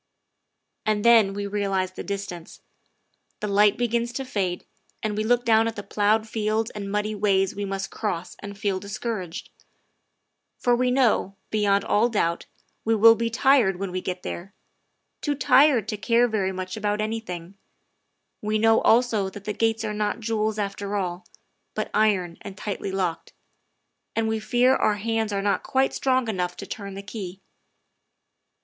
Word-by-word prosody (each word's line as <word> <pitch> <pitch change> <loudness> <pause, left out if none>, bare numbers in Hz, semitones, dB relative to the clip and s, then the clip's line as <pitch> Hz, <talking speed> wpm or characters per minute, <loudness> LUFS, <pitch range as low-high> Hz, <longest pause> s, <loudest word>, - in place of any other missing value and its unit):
And 215 0 0
then 225 -4 +6
we 205 0 -3
realize 195 -2 -1
the - - -7
distance. 195 -4 -6 0.8
The 210 - -3
light 205 0 +4
begins 235 0 0
to 270 +2 -4
fade, 190 -8 -2 0.4
and 215 -1 -1
we 215 - -1
look 245 +2 +2
down 225 0 +4
at 230 - -3
the 205 - -6
ploughed 215 +2 +1
fields 220 0 -1
and 200 -1 -6
muddy 210 +1 -1
ways 195 -2 +1
we 205 0 -3
must 195 0 -4
cross 185 -5 -3
and 200 0 -8
feel 200 -3 -1
discouraged. 200 -3 -5 1.1
For 245 -1 +2
we 250 +1 +1
know, 250 -6 +2 0.2
beyond 200 -2 +2
all 225 +4 +3
doubt, 170 -7 -1 0.4
we 225 0 +2
will 225 +2 +8
be 230 0 -1
tired 240 -4 +4
when 195 0 -4
we 185 0 -3
get 180 0 -4
there 190 +4 -6 0.7
too 290 -1 0
tired 270 -4 +4
to 210 - -2
care 230 +4 +3
very 200 -4 0
much 185 0 -5
about 210 -1 -1
anything; 205 -5 -4 0.9
we 215 +1 0
know 225 +1 +4
also 225 -4 +3
that 200 +1 -10
the 210 - -2
gates 225 +1 0
are 210 - -2
not 210 +2 -1
jewels 220 -1 -1
after 200 0 -3
all, 180 -1 -3 0.5
but - - -3
iron 190 -6 +1
and 200 -2 -9
tightly 200 -2 -4
locked; 185 -4 -2 0.8
and 225 0 +1
we 220 0 0
fear 245 +4 +3
our 210 - +2
hands 220 +1 -1
are 200 -1 -1
not 200 -1 +1
quite 265 0 +1
strong 260 -2 +1
enough 180 -4 -2
to - - -7
turn 200 -2 -7
the 195 - -7
key. 200 -3 -7
210 Hz, 170 wpm, -25 LUFS, 195-225 Hz, 1.1 s, will